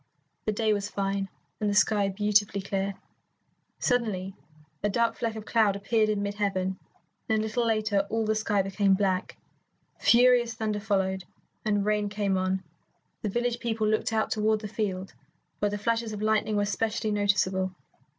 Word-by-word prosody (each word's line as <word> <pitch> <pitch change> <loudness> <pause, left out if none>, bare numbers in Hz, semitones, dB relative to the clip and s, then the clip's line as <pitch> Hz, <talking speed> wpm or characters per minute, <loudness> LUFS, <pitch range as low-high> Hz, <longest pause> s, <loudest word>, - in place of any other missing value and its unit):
The 215 - +1
day 215 0 +1
was 205 -1 -2
fine, 195 0 -2 0.3
and 210 - 0
the 205 - 0
sky 205 -1 +3
beautifully 205 0 +2
clear. 195 0 -2 0.8
Suddenly 210 -7 0 0.5
a 205 - +1
dark 230 +3 +2
fleck 230 -2 -2
of 215 -1 -7
cloud 220 -4 +3
appeared 215 +2 +1
in 205 -1 0
mid 200 0 -2
heaven, 190 -2 -1 0.5
and 220 - +3
a - - +1
little 220 +2 0
later 210 -3 +1
all 225 +1 0
the 215 - +2
sky 210 -2 +1
became 195 0 +2
black. 190 -2 -1 0.6
Furious 240 -1 +5
thunder 215 -2 -1
followed, 190 -3 0 0.4
and 205 -2 +1
rain 210 -1 +1
came 200 -1 0
on. 185 0 0 0.6
The 210 - -1
village 240 +3 -1
people 225 -2 -1
looked 215 +1 +1
out 220 -1 0
toward 215 0 +1
the 215 - -4
field, 195 -3 -3 0.5
where 205 - +1
the 205 - -3
flashes 230 +1 -1
of 210 - -5
lightning 215 0 +2
were 205 0 +2
specially 215 +1 -1
noticeable. 190 -2 +1
210 Hz, 170 wpm, -28 LUFS, 195-220 Hz, 0.8 s, Furious